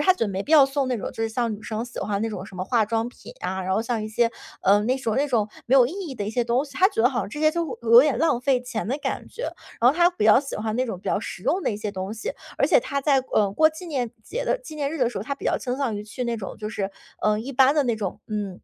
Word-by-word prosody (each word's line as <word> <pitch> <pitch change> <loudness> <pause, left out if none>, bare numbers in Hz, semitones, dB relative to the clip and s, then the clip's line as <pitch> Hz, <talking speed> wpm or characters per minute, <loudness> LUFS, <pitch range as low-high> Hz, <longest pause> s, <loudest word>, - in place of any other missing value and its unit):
他 370 +5 +5
觉 360 - -1
得 210 - -2
没 195 0 -2
必 - - -10
要 295 -4 +8
送 275 -1 -1
那 250 -3 -1
种， - - -5
就 225 - -4
是 225 - 0
像 230 -1 -1
女 210 - -11
生 220 +1 -3
喜 240 - -7
欢 200 -1 -1
那 225 - 0
种 195 -3 -5
什 195 - -12
么 185 - -3
化 230 0 +2
妆 225 +2 -1
品 - - -13
啊， 190 +1 -3
然 190 - -1
后 205 - +2
像 230 -1 -2
一 215 - -4
些， 230 +2 +2 0.3
呃， 200 +2 +5
那 250 +5 +1
种 230 -5 -1
那 285 +2 +1
种 220 -5 +1 0.2
没 265 +3 +4
有 250 - +7
意 280 - -6 0.2
义 - - -5
的 210 -5 -4
一 - - -2
些 245 +1 +1
东 240 +4 +1
西。 285 - -13
他 380 - +5
觉 405 - -2
得 245 - +5
好 250 -3 -1
像 195 - -4
这 295 - -7
些 310 0 +3
就 330 -8 -3
有 230 +1 +8
点 295 -2 +1
浪 310 -7 +2
费 255 -1 +2
钱 245 -3 -4
的 270 +4 -1
感 - - -1 0.2
觉。 480 - -8 0.4
然 240 +2 +7
后 280 - -4
他 345 0 +6
比 350 - -2
较 215 +3 +7
喜 275 - -6
欢 215 0 -2
那 255 0 +1
种 195 - -4
比 - - -16
较 - - +2
实 180 - -7
用 360 - +1
的 - - +1
一 205 - -3
些 210 -1 -4
东 190 +1 -4
西， 220 - -4 0.3
而 - - +3
且 - - +5
他 280 -10 -3
在， 275 -1 +3
呃， 205 -2 +3
过 315 +9 +5
纪 315 +3 -10
念 255 -7 -2
节 - - -4
的 - - +1
纪 - - -10
念 290 -2 -2
日 325 - -4
的 245 -3 +2
时 245 - -5
候， - - -4
他 280 - -2
比 - - -12
较 - - +1
倾 250 -1 -3
向 265 -6 -1
于 205 - -5
去 230 +4 -5
那 235 -1 -1
种 195 -3 -7
就 210 - -6
是， 200 -2 -3 0.3
呃， 210 0 +2
一 250 +6 -5
般 265 +2 +5
的 300 - +3
那 240 -4 0
种， 200 -4 -4
嗯， 205 -4 -4
235 Hz, 355 characters per minute, -24 LUFS, 215-275 Hz, 0.4 s, 要